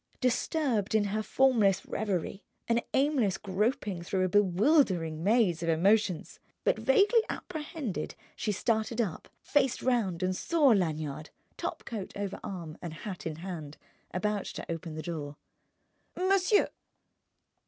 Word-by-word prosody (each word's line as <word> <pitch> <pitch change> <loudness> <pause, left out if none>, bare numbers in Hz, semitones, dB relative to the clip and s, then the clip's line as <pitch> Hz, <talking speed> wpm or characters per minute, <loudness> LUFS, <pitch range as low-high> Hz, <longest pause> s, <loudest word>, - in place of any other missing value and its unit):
Disturbed 250 - +1
in 215 - +4
her 205 +2 -1
formless 215 -6 +3
reverie, 200 -1 -2 0.2
an 235 0 +2
aimless 265 -8 +2
groping 205 -1 -1
through 185 +2 -1
a - - 0
bewildering 185 - +3
maze 205 -5 +3
of 170 - -1
emotions 190 +2 +2 0.2
but - - +2
vaguely 460 -1 +4
apprehended, 295 - -4 0.2
she 215 - -1
started 220 +3 0
up, 200 -9 -2
faced 270 -4 +1
round 205 -9 +1
and 185 0 +1
saw 310 - +3
Lanyard, 155 - 0 0.3
topcoat 210 -5 -5
over 200 -1 -3
arm 170 -5 -6
and 170 -3 -6
hat 190 -3 -6
in 160 - -4
hand, 160 -4 -7 0.3
about 205 +1 -1
to - - -6
open 165 -1 -5
the 155 - -5
door. 150 -4 -5 0.8
"Monsieur!" 390 +2 +3
200 Hz, 130 wpm, -30 LUFS, 175-245 Hz, 0.8 s, in